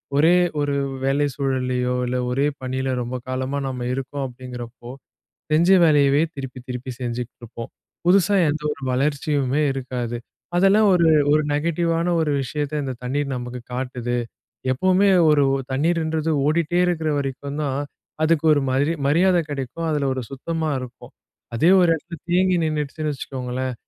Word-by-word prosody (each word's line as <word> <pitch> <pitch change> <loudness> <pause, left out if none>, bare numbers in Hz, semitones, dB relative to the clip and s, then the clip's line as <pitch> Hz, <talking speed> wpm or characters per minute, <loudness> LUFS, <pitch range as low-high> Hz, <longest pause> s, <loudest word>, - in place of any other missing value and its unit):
ஒரே 160 +5 +5 0.3
ஒரு 145 -1 0 0.3
வேலை 145 +2 +2
சூழல்லயோ, 130 -2 -1
இல்ல 125 +1 -1
ஒரே 135 +3 +1 0.2
பணில 130 +1 -2
ரொம்ப 120 +2 -4
காலமா 130 +2 -2
நம்ம 125 -2 -4
இருக்கோம் 135 +1 -4
அப்பிடிங்கிறப்போ, 125 -1 -9 0.6
செஞ்ச 165 +4 +4
வேலையவே, 145 -2 +4
திருப்பி 130 -2 -7
திருப்பி 125 +1 -5
செஞ்சுக்கிட்டுருப்போம். 120 -1 -6 0.4
புதுசா 195 +2 +4
எந்த 150 +1 -2
ஒரு 140 - -8
வளர்ச்சியுமே 140 +1 0
இருக்காது. 125 -3 -4 0.4
அதெல்லாம் 195 +4 +5
ஒரு, 170 -2 +4 0.2
ஒரு 155 - +4
நெகட்டிவான 165 +2 0
ஒரு 155 -2 +1
விஷயத்த 150 +3 -3
இந்த 130 -1 -3
தண்ணீர் 140 +2 -1
நமக்கு 125 0 -5
காட்டுது. 125 -1 -3 0.6
எப்பவுமே 185 +8 +3 0.2
ஒரு 145 -1 +4
ஒ - - +1 0.2
தண்ணீர்ன்றது 160 +2 0 0.2
ஓடிகிட்டே 170 +2 +1
இருக்கிற 160 -3 0
வரைக்கும் 140 +2 -4
தான், 140 -2 -1 0.4
அதுக்கு 160 0 +2
ஒரு 145 - +3
மாதிரி 140 +5 +2
மரியாத 180 +5 +4
கிடைக்கும். 140 +4 -4
அதில 145 -3 0
ஒரு 130 - -3
சுத்தமாக 155 +1 -2
இருக்கும் 125 -1 -10 0.4
அதே 160 +10 +4
ஒரு 175 - +4
இடத்தில 165 +1 -7
தேங்கி 185 0 +3
நின்னுடுச்சுன்னு 150 0 -2
வச்சுக்கோங்களேன். 130 -1 -4
140 Hz, 140 wpm, -22 LUFS, 130-160 Hz, 0.6 s, ஒரே